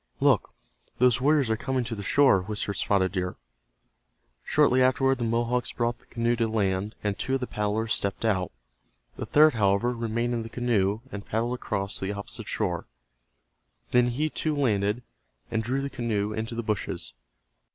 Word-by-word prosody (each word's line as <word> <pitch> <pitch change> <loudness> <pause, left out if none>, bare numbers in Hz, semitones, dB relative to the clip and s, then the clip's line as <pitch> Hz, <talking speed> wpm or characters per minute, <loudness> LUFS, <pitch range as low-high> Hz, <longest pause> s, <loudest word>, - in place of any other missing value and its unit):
"Look, - - +2 0.4
those 125 0 +4
warriors 140 -4 +3
are - - +3
coming 130 +2 -1
to 115 0 -4
the 105 - -5
shore," 130 -2 +4
whispered 105 +1 -3
Spotted 95 -1 +1
Deer. 90 -2 -2 1.1
Shortly 135 -4 +3
afterward 130 +1 +3
the - - -1
Mohawks 120 +2 0
brought 120 0 -1
the - - -27
canoe 120 0 0
to 115 -1 +1
land, 100 -1 -1
and 105 -1 0
two 130 - 0
of - - 0
the 125 - -2
paddlers 105 0 -1
stepped 100 +3 -1
out. 95 -5 +1 0.7
The - - -5
third, 155 0 +6
however, 105 +2 +2
remained 115 +1 -1
in 115 - -1
the 115 - -7
canoe, 110 -4 0
and 100 0 -6
paddled 115 +3 -1
across 100 -5 -3
to - - -3
the 100 - -2
opposite 100 0 -6
shore. - - -2 1.0
Then, 125 0 +4
he, 145 +6 -1
too, 155 -1 -1
landed, 110 -4 +1 0.5
and 110 - +1
drew 130 +5 -1
the - - -1
canoe 110 -5 -2
into 110 +2 -4
the 115 - -3
bushes. 105 -3 -3
115 Hz, 175 wpm, -27 LUFS, 105-125 Hz, 1.1 s, third